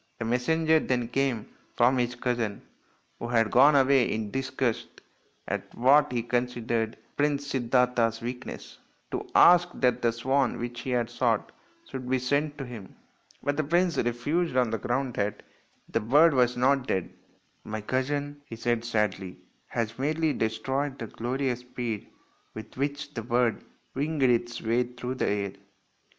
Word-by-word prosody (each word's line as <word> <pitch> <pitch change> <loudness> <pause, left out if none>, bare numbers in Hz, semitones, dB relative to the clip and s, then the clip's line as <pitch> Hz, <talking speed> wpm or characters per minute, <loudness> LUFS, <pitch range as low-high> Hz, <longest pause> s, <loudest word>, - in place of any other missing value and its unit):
A 115 - -2
messenger 160 +7 +2
then 125 -5 -1
came 125 -4 0 0.3
from 125 +2 +4
his 120 0 0
cousin, 120 -4 -2 0.6
who 115 - -4
had 115 -2 +2
gone 140 +4 +6
away 135 -2 +4
in 110 -1 -3
disgust 130 -3 -1 0.6
at - - -4
what 140 +4 +5
he 120 -2 -1
considered 120 -2 -1 0.2
Prince 145 -1 +1
Siddartha's 125 -3 +1
weakness, 125 +2 -7 0.3
to - - -4
ask 175 0 +7
that 125 -2 +1
the 115 - +3
swan 130 +3 0
which 120 0 -5
he 130 - -5
had 120 -2 +1
shot 120 -2 0 0.4
should 130 -1 -6
be 130 - +3
sent 145 +4 0
to 135 - -5
him. 115 -6 -10 0.5
But 145 0 -1
the 155 - +1
prince 175 +3 +2
refused 130 +6 0
on 125 -3 +3
the 115 - -1
ground 125 +3 -1
that 100 0 -2 0.4
the - - 0
bird 145 +9 +5
was 125 -2 +2
not 130 +1 +2
dead. 95 -2 -1 0.3
" - - -41
My 110 0 -5
cousin," 145 +5 -2
he 115 - -8
said 115 0 -1
sadly, 105 -5 -1 0.2
" - - -41
has 115 +1 -2
merely 155 +2 +1
destroyed 135 +5 -2
the 115 - -5
glorious 125 +3 -2
speed 120 -3 -5 0.5
with 110 - -9
which 145 +2 -3
the 115 - -4
bird 120 0 +1 0.3
winged 145 +1 -1
its 120 -1 +1
way 115 +2 +2
through 125 +1 -4
the 130 - -1
air." 100 -1 -1
125 Hz, 160 wpm, -27 LUFS, 115-140 Hz, 0.6 s, ask